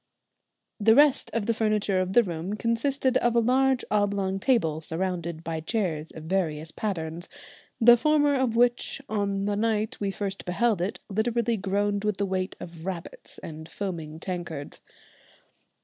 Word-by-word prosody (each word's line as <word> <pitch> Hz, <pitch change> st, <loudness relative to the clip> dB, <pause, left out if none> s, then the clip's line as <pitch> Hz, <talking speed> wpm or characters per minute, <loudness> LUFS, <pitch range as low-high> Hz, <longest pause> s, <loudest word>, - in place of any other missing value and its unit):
The 220 Hz, +2 st, +5 dB
rest 290 Hz, 0 st, +5 dB
of 230 Hz, -3 st, -1 dB
the 230 Hz, -, +2 dB
furniture 210 Hz, -3 st, +1 dB
of 185 Hz, +1 st, -2 dB
the 240 Hz, -, +6 dB
room 175 Hz, +1 st, -4 dB
consisted 255 Hz, +4 st, +1 dB
of 240 Hz, 0 st, +1 dB
a -, -, +6 dB
large 260 Hz, +2 st, +2 dB
oblong 200 Hz, -2 st, +1 dB
table, 175 Hz, -, +1 dB
surrounded 170 Hz, -1 st, -3 dB
by 165 Hz, -1 st, -3 dB
chairs 160 Hz, -4 st, -2 dB
of 160 Hz, -, -10 dB
various 160 Hz, -3 st, -1 dB
patterns, 170 Hz, -4 st, -4 dB, 0.5 s
the 240 Hz, 0 st, +8 dB
former 290 Hz, +2 st, +3 dB
of 260 Hz, -4 st, +1 dB
which 240 Hz, +2 st, +2 dB
on 200 Hz, -2 st, -1 dB
the 205 Hz, 0 st, 0 dB
night 215 Hz, 0 st, 0 dB
we 200 Hz, -, -1 dB
first 195 Hz, 0 st, -4 dB
beheld 200 Hz, +2 st, +1 dB
it 185 Hz, +4 st, -2 dB
literally 230 Hz, +3 st, 0 dB
groaned 205 Hz, 0 st, 0 dB
with 210 Hz, -2 st, 0 dB
the 200 Hz, -, 0 dB
weight 185 Hz, -1 st, -2 dB
of 170 Hz, -2 st, -9 dB
"rabbits" 180 Hz, -2 st, -6 dB
and 160 Hz, 0 st, -8 dB
foaming 165 Hz, -5 st, -5 dB
tankards. 170 Hz, -5 st, -5 dB
200 Hz, 155 wpm, -27 LUFS, 175-230 Hz, 0.5 s, the